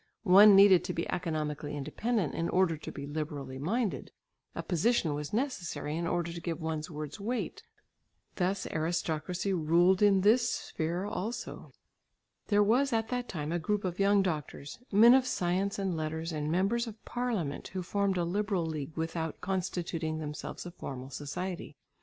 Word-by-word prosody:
One 200 +1 +8
needed 195 -2 +7
to - - -2
be 165 - -2
economically 150 -3 -3
independent 205 - -1
in 165 - -1
order 180 -3 +2
to 155 - -8
be 140 - -7
liberally 145 -3 -5
minded; 190 - -1 0.5
a - - -3
position 175 -2 +1
was 145 0 -4
necessary 210 - -2
in 170 +1 -2
order 170 0 -1
to 170 - -7
give 170 -1 -3
one's 160 0 -3
words 150 +1 -6
weight; 235 +5 -3 0.8
thus 185 +1 0
aristocracy 170 +3 -1
ruled 175 +3 +3
in 200 -2 +5
this 230 +4 +4
sphere 170 +4 -3
also. 210 +3 -5 0.7
There 205 -1 +4
was 250 +7 +3
at 225 -1 0
that 245 -1 -2
time 150 -2 -4
a 175 - 0
group 205 +5 -1
of 180 0 -3
young 200 0 +4
doctors, 150 - -4
men 225 +4 +8
of 260 -1 +4
science 185 +1 0
and 190 -3 -1
letters, 160 +1 -3
and 150 -1 -2
members 200 +7 +1
of 220 -1 -10
parliament 225 - -2
who 185 0 -5
formed 200 +1 0
a 175 - +1
liberal 195 -1 0
league 155 -1 -5
without 160 -1 -3
constituting 175 -4 -2
themselves 150 +2 -6
a 175 - -6
formal 135 -5 -7
society. 150 +4 -5
175 Hz, 165 wpm, -30 LUFS, 155-200 Hz, 0.8 s, One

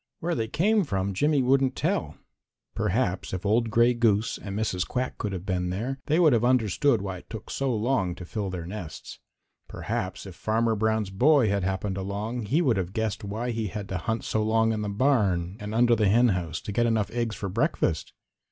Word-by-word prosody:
Where 175 +1 -1
they 115 -5 -1
came 205 - +2
from 100 - -2
Jimmy 145 +6 +2
wouldn't 135 +1 +2
tell. - - -1 0.6
Perhaps 105 -3 -1
if 95 - -6
old 115 +3 +2
Gray 120 +2 +4
Goose 115 -2 +1
and 100 -1 -5
Mrs. 95 -5 -1
Quack 130 0 -3
could 105 - -2
have 95 -1 -5
been 90 -2 -1
there, 120 +9 -3
they 155 +3 +3
would 160 -6 +6
have 115 -1 +2
understood 120 -1 +2
why 95 -2 -4
it - - -15
took 110 -3 -8
so 135 -1 -1
long 105 -6 0
to 90 - -9
fill 100 +2 -3
their 90 -3 -5
nests. 90 -4 -8 0.5
Perhaps - - -4
if - - -8
Farmer 115 +1 0
Brown's 110 -1 0
boy 125 +3 +4
had 100 0 +1
happened 95 +1 -2
along, 105 +4 -4
he 150 +10 +2
would 125 -8 +2
have 95 0 -2
guessed 110 -3 -2
why 110 +5 -3
he 115 -2 -2
had 100 +2 -6
to 95 - -2
hunt 110 +7 -2
so 110 - 0
long 110 +1 +2
in 110 - -2
the 105 - -2
barn 100 -7 +1
and 105 +1 -5
under 120 0 +5
the 105 -2 +2
henhouse 95 -8 +2
to - - -6
get 120 +4 +2
enough 110 -3 0
eggs 115 -2 -2
for 100 - -4
breakfast. 95 - 0
110 Hz, 205 wpm, -26 LUFS, 95-120 Hz, 0.6 s, would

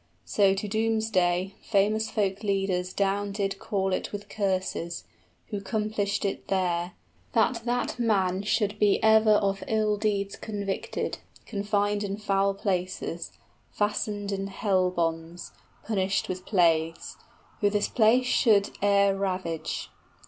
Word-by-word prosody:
So 195 -2 +3
to 200 +2 -3
doomsday, 205 -4 +1
famous 215 +1 +1
folk 200 -2 -1
leaders 195 -3 0
down 200 +1 0
did 195 -1 -2
Call 190 -2 -1
it - - -2
with 205 0 -7
curses 185 -4 -2 0.5
who 205 -2 -3
'complished 210 -1 -1
it 195 - -3
there 180 -2 0 0.4
That 230 +1 +2
that 245 0 -1
man 195 -5 +1
should 210 0 0
be 205 -1 +4
ever 220 0 +6
of 195 -1 +1
ill 215 -1 +1
deeds 200 -2 -1
convicted, 200 -3 -3 0.2
15 - - -33
Confined 205 -1 0
in 200 0 -3
foul 195 -1 +1
places, 185 -3 -3 0.4
fastened 205 -1 -1
in 195 0 -2
hell 190 -2 +1
bonds, 165 -1 -3 0.3
Punished 195 -3 0
with 185 0 -5
plagues, 165 -4 +1 0.4
who 205 - +3
this 205 0 +1
place 240 +3 +4
should 215 -5 +3
e'er 200 -1 +4
ravage. 185 -4 -3
200 Hz, 130 wpm, -27 LUFS, 190-210 Hz, 0.5 s, ever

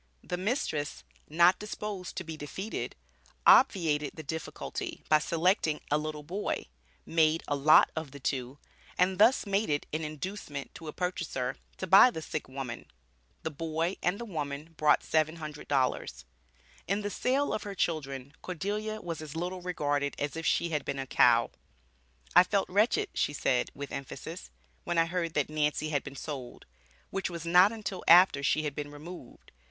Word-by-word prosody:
The - - -3
mistress, 180 - -2 0.3
not 170 +4 +5
disposed 210 -3 -5
to 185 - -3
be 160 -2 -6
defeated, 155 +8 -5 0.5
obviated 160 - +5
the 160 - -7
difficulty 160 +3 -5
by 155 - +6
selecting 165 -1 +1
a 150 - +3
little 150 -1 -5
boy, 190 +7 -3 0.4
made 160 0 +2
a 145 - 0
lot 145 +2 +6
of 160 -3 -4
the 140 +1 -11
two, 130 0 -3 0.4
and 185 +1 +2
thus 225 +4 +5
made 200 +2 0
it 145 -1 0
an 155 - -1
inducement 155 -2 -6
to 160 - -10
a - - -3
purchaser 160 -8 -2 0.2
to - - -3
buy 195 +7 +8
the 160 -9 -6
sick 155 -3 -5
woman; 130 -3 -6 0.6
the 160 - -2
boy 165 +4 -2
and 180 +3 +1
the 235 - -5
woman 150 -4 -5
brought 150 -1 +4
$700. 155 -4 -1 0.6
In 200 +3 0
the 205 - -2
sale 270 +6 +1
of - - -2
her 200 -1 -6
children, 140 -6 -2
Cordelia 210 +5 -3
was 165 -3 -5
as 155 -1 -8
little 180 +2 -3
regarded 145 -5 -1
as 145 +1 -3
if 165 0 -3
she 170 - +2
had 150 -2 -1
been 140 - -3
a 135 - -3
cow. - - +4 0.8
"I - - +10
felt 195 +1 0
wretched," 225 - +2
she 145 - 0
said, 125 -3 +1
with 140 -1 -6
emphasis, 130 - -7 0.3
"when 175 - -2
I 165 - +5
heard 170 -1 -2
that 150 - +2
Nancy 155 0 0
had 145 -3 0
been 140 - -9
sold," 135 -4 -7 0.5
which 195 0 -2
was 170 -2 -6
not 180 +4 +6
until 210 -5 -5
after 175 -4 +7
she 155 +2 +2
had 150 -2 -2
been 145 0 -5
removed. 145 -1 -11
160 Hz, 170 wpm, -30 LUFS, 145-185 Hz, 0.8 s, I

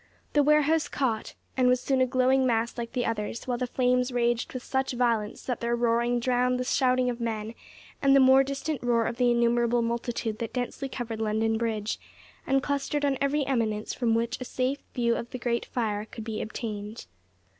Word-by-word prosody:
The 295 - +5
warehouse 300 +2 +3
caught, 235 -6 -2 0.2
and 255 -1 +3
was 250 0 +4
soon 265 0 +1
a 255 - +4
glowing 260 +1 +3
mass 235 -2 +1
like 235 0 -5
the 245 -2 0
others, 225 0 -3
while 245 -2 -2
the 250 - -1
flames 250 0 +1
raged 240 -1 0
with 255 -1 -6
such 265 -1 -1
violence 235 -4 0
that 250 -3 -3
their 235 0 +1
roaring 235 0 +1
drowned 250 +1 +1
the - - 0
shouting 255 -1 +2
of 245 -1 -2
men, 220 -1 -3 0.5
and 275 0 +5
the - - +7
more 265 0 +7
distant 275 +1 -3
roar 235 -2 +2
of 235 - -3
the 245 -1 +3
innumerable 235 0 +2
multitude 235 -1 -2
that 230 - -4
densely 255 +2 -3
covered 230 -4 -5
London 220 +1 +1
Bridge, 220 -2 -2 0.5
and 270 0 +2
clustered 285 +1 -1
on 275 -2 0
every 280 +1 +1
eminence 220 -5 -1
from 230 -3 +1
which 235 +2 -1
a - - -1
safe 255 +2 -1 0.2
view 235 -2 +2
of 235 - -5
the 255 - -5
great 235 -1 -1
fire 215 -3 -2
could 220 0 -9
be 220 -1 -4
obtained. 215 -1 -5
245 Hz, 200 wpm, -27 LUFS, 230-260 Hz, 0.5 s, the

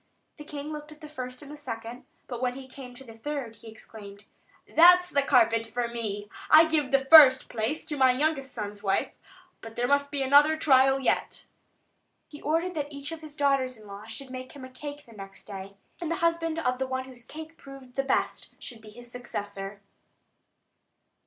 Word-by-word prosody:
The 300 - -9
king 295 0 -7
looked 300 0 -8
at 305 - -14
the 305 - -10
first 255 -3 -7
and 285 - -11
the - - -8
second; 230 -3 -7 0.2
but 245 -2 -7
when 250 -1 -1
he 265 -1 -9
came 255 -2 -11
to 270 - -12
the 230 -3 -13
third, 245 -2 -5
he 230 - -15
exclaimed: 210 -2 -12 0.4
"That's 360 +2 +6
the 280 - +3
carpet 230 -4 +3
for 240 +2 -2
me! 215 -3 -4 0.2
I 315 +1 +8
give 310 -4 0
the 270 0 +2
first 270 -3 +8
place 235 +8 -2
to 300 - -4
my 260 -1 +5
youngest 275 0 -1
son's 205 -2 -6
wife; 195 -1 0 0.5
but 225 0 -10
there 245 +1 0
must 285 +1 +2
be 280 -1 -1
another 290 +4 +5
trial 270 -2 +4
yet." 265 - -1
And - - -32 0.8
he 295 - -11
ordered 330 +4 0
that 295 -3 -4
each 280 +1 -6
of 325 -1 -7
his 305 -2 -10
daughters 275 -4 +1
in 215 - -16
law 200 +1 -10
should 255 +4 -8
make 255 0 -8
him 275 -2 -10
a 260 - -13
cake 290 +3 -8
next 195 -1 -11
day; 195 -1 -9 0.2
and 335 - -4
the 335 - 0
husband 330 -1 0
of 255 -6 -1
the 265 - -1
one 260 0 -3
whose 255 -2 -13
cake 315 +5 -10
proved 275 -3 -13
the 270 - +1
best 270 -1 -1
should 235 -3 -10
be 215 - -13
his 240 +2 -12
successor. 205 -5 -6
260 Hz, 205 wpm, -27 LUFS, 230-295 Hz, 0.8 s, I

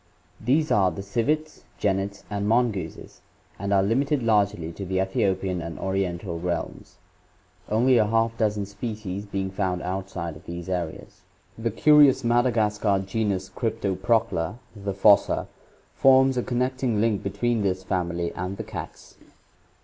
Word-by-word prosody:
— 90 0 -27
These 155 +3 +3
are 95 -2 +4
the 90 +3 -6
civets, 150 +9 -1 0.2
genets, 100 0 -1
and 100 0 -2
mongooses, 110 -8 -1 0.4
and 100 +1 -3
are 100 -1 +4
limited 135 +6 +1
largely 100 -7 +1
to 90 +4 -7
the 95 0 -1
Ethiopian 95 -1 0
and 85 0 -6
Oriental 95 -2 -2
realms, 85 0 -4 0.7
only 120 +3 +4
a 105 - +3
half 115 +1 +1
dozen 105 -2 0
species 100 -1 -5
being 95 -1 -3
found 95 -2 -2
outside 90 -3 -4
of 75 - -15
these 85 +1 -6
areas. 90 -4 -4 0.3
The 115 +1 -2
curious 145 +4 +5
Madagascar 110 -4 +2
genus 100 -2 -1
Cryptoprocta, 105 -1 -1 0.2
the 100 -1 -4
fossa, 100 +1 +4 0.5
forms 130 0 +5
a 125 - +1
connecting 125 -2 -1
link 110 -2 +1
between 115 +3 -1
this 95 -2 -1
family 85 -2 -2
and 90 +2 -4
the - - -4
cats. - - -9
100 Hz, 140 wpm, -25 LUFS, 95-115 Hz, 0.7 s, curious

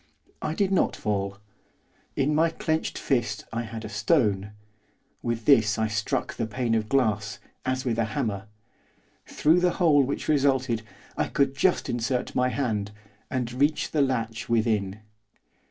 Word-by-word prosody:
I 155 - -2
did 195 0 +1
not 190 - +2
fall. 100 -2 -2 0.8
In 140 +2 +1
my 160 +2 +4
clenched 160 -1 -2
fist 120 -5 -1
I 115 - -1
had 110 -1 -6
a - - -4
stone. 105 - +1 0.7
With 115 -1 -2
this 110 -7 +5
I 110 0 +1
struck 105 0 -1
the 115 - -3
pane 115 +1 -1
of 110 -1 0
glass, 110 -6 +1 0.3
as 130 +1 -1
with 115 -2 0
a 115 - +2
hammer. 105 -2 -3 0.8
Through 160 +4 +3
the 180 0 +2
hole 155 -6 +5
which 135 +1 -2
resulted, 135 -5 +2 0.3
I - - 0
could 140 -1 +1
just 180 +5 +2
insert 120 +1 -1
my 125 0 +2
hand, 110 -7 -1 0.4
and 125 -2 -2
reach 145 +4 +1
the 150 - +2
latch 115 -4 -1
within. 110 -3 +1
120 Hz, 155 wpm, -26 LUFS, 110-140 Hz, 0.8 s, this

